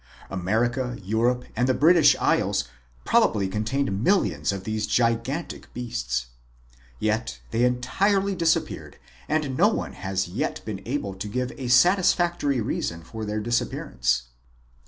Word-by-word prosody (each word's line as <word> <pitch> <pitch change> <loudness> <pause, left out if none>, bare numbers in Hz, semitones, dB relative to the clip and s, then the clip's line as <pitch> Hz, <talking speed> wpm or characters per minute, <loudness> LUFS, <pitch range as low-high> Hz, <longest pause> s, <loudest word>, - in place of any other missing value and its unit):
America, 120 +7 0
Europe, 120 +5 +1
and 125 +3 +1
the 130 - +3
British 155 0 +6
Isles - - +2 0.4
probably 100 -2 +3
contained 105 +2 -1
millions 100 - +2
of 95 -1 -5
these 110 0 -2
gigantic 120 +8 -1
beasts. - - -2 0.7
Yet 110 - -1
they 115 +1 +1
entirely 195 +12 +1
disappeared 165 -3 -1 0.3
and 150 -4 0
no 190 +9 +5
one 220 - -2
has 95 -1 -2
yet 90 - -2
been 105 -3 -5
able 120 -7 -2
to 95 +2 -6
give 125 +4 -2
a 130 - -6
satisfactory 175 0 +3
reason 85 -6 -3
for 110 +5 -6
this 105 0 -3
dis 120 +2 +2
appearance. 60 0 -1
120 Hz, 135 wpm, -25 LUFS, 100-140 Hz, 0.7 s, British